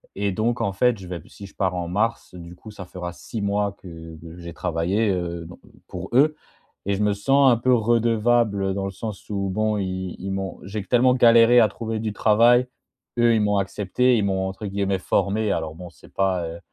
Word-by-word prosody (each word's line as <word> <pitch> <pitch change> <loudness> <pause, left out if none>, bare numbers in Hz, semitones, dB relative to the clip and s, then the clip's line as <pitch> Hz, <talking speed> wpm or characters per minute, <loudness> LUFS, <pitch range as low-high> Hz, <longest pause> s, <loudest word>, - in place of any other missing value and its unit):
et 100 0 -1
donc 115 +5 -1
en 100 - -1
fait 120 +4 +2
je 95 -2 -11
vais 85 -2 -6
si 100 - -12
je 100 - -14
pars 95 -2 -1
en 85 -1 -3
mars 110 +5 -2
du 85 -1 -10
coup 110 +4 -12
ça 95 -3 -9
fera 90 -1 -7
6 110 +4 -7
mois 100 0 0
que 80 -2 -11
que 85 +1 -11
j'ai 85 -1 -9
travaillé, 90 +6 0
heu, 85 -2 -3
don 90 - -12 0.3
pour - - -7
eux 150 +5 +4 0.5
et 100 - +1
je 105 - -1
me 105 - +2
sens 135 +6 +4
un 120 - +3
peu 125 +2 +1
redevable 115 -3 +2
dans 95 0 -3
le 95 - -4
sens 105 +1 -8
où 100 -2 -2
bon 110 +2 0
ils 95 -1 -4
ils 95 +1 -5
m'ont 95 -1 -4
j'ai 100 +2 -5
q 95 - -14
tellement 125 +1 +4
galéré 120 -1 +6
à 110 - +6
trouver 110 +1 -5
du 110 -1 -3
travail. 120 +4 +4 0.5
Eux 120 -1 +4
ils 110 - +2
m'ont 105 -1 +1
accepté, 105 +6 +1
ils 105 - +1
m'ont 95 -1 -1
entre 95 +3 -7
guillemets 100 0 -1
formé. 105 +3 0
Alors 80 0 -3
bon, 90 +1 -9
c'est 70 - -19
pas, 95 -3 0
heu 85 +1 -8
100 Hz, 220 wpm, -23 LUFS, 95-115 Hz, 0.5 s, galéré